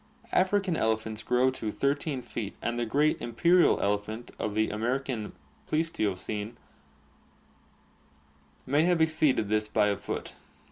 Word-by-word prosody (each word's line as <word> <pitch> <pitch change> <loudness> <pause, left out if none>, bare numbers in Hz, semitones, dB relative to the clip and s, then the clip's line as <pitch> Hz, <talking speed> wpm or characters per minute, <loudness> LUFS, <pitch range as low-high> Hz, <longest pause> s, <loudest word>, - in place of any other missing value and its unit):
African 190 -1 +2
elephants 110 -3 -1
grow 125 +1 +2
to 110 -4 -4
13 140 0 -1
feet 105 -4 -5
and 120 0 -2
the 120 - -1
great 145 +6 +2
imperial 170 +10 +4
elephant 105 +3 -2
of 105 - -2
the 110 0 +1
American 120 +1 -2 0.3
Pleistocene 110 - -2 2.1
may 145 +3 +3
have 175 +1 +3
exceeded 155 -8 +2
this 105 +1 +1
by 105 -1 +2
a 100 - +1
foot. - - -5
120 Hz, 125 wpm, -28 LUFS, 110-155 Hz, 2.1 s, imperial